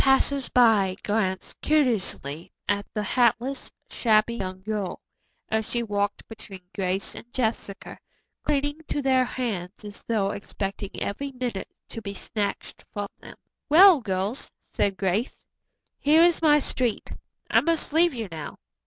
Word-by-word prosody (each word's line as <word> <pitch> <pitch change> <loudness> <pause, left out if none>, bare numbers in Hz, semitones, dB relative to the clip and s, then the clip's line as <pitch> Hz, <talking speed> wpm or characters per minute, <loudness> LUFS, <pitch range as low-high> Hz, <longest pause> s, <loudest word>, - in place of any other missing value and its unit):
Passersby 245 -8 +4
glanced 190 -3 -1
curiously 215 - 0 0.2
at 205 0 0
the 210 - 0
hatless, 245 +4 +1 0.2
shabby 220 0 +3
young 185 -2 -5
girl, 210 -3 -3 0.5
as 220 0 -1
she 240 -1 0
walked 205 -2 -2
between 215 -4 -10
Grace 190 0 -1
and 240 - -11
Jessica, 220 -5 -3 0.4
clinging 290 +1 0
to 290 - -1
their 260 -1 +4
hands 215 -6 -4
as 205 -1 -9
though 205 -4 0
expecting 200 -1 -4
every 275 +8 -3
minute 245 -7 -4 0.2
to 225 - -7
be 200 -2 -6
snatched 205 +1 -4
from 205 -1 -4
them. - - -12 0.3
"Well, 345 0 +8
girls," 200 +3 -2 0.2
said 195 -2 +1
Grace, 200 +6 0 0.6
"here 310 +3 +5
is 345 -1 +4
my 300 -2 +6
street. 250 -5 -1 0.4
I - - +6
must 330 -3 0
leave 335 -2 +4
you 225 -3 -3
now. 155 -3 -7
220 Hz, 135 wpm, -26 LUFS, 200-265 Hz, 0.6 s, Well